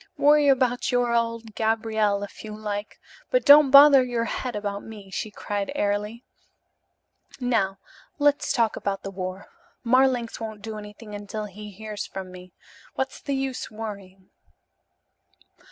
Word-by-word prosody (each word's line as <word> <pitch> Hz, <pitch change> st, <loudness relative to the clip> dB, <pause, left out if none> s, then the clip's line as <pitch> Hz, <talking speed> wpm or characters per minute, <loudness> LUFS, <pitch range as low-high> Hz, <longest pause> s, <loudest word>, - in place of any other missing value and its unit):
Worry 295 Hz, 0 st, +5 dB
about 255 Hz, -3 st, +2 dB
your 245 Hz, -1 st, +1 dB
old 230 Hz, -1 st, -1 dB
Gabriel, 220 Hz, -2 st, 0 dB
if 205 Hz, -, -9 dB
you 215 Hz, -1 st, -7 dB
like, 210 Hz, -1 st, -5 dB, 0.3 s
but -, -, +1 dB
don't 290 Hz, 0 st, +8 dB
bother 280 Hz, -1 st, +9 dB
your 240 Hz, -2 st, -1 dB
head 250 Hz, 0 st, -4 dB
about 205 Hz, -1 st, -3 dB
me," 205 Hz, -3 st, -11 dB
she 215 Hz, -, -3 dB
cried 205 Hz, +2 st, -4 dB
airily. 210 Hz, +1 st, -2 dB, 1.2 s
"Now 225 Hz, -6 st, 0 dB, 0.4 s
let's 290 Hz, -1 st, +2 dB
talk 235 Hz, -6 st, +1 dB
about 195 Hz, -1 st, -3 dB
the 195 Hz, -, -5 dB
war. 185 Hz, 0 st, -6 dB, 0.3 s
Marlanx 255 Hz, -1 st, +2 dB
won't 220 Hz, -2 st, -7 dB
do 220 Hz, -1 st, -6 dB
anything 210 Hz, +1 st, -11 dB
until 205 Hz, +1 st, -5 dB
he 210 Hz, +1 st, -10 dB
hears 210 Hz, +1 st, -7 dB
from 190 Hz, -1 st, -7 dB
me. 180 Hz, 0 st, -12 dB, 0.4 s
What's 265 Hz, 0 st, -3 dB
the 280 Hz, -, -2 dB
use 270 Hz, -1 st, -3 dB
worrying?" 200 Hz, -4 st, -9 dB
220 Hz, 140 wpm, -25 LUFS, 205-250 Hz, 1.2 s, bother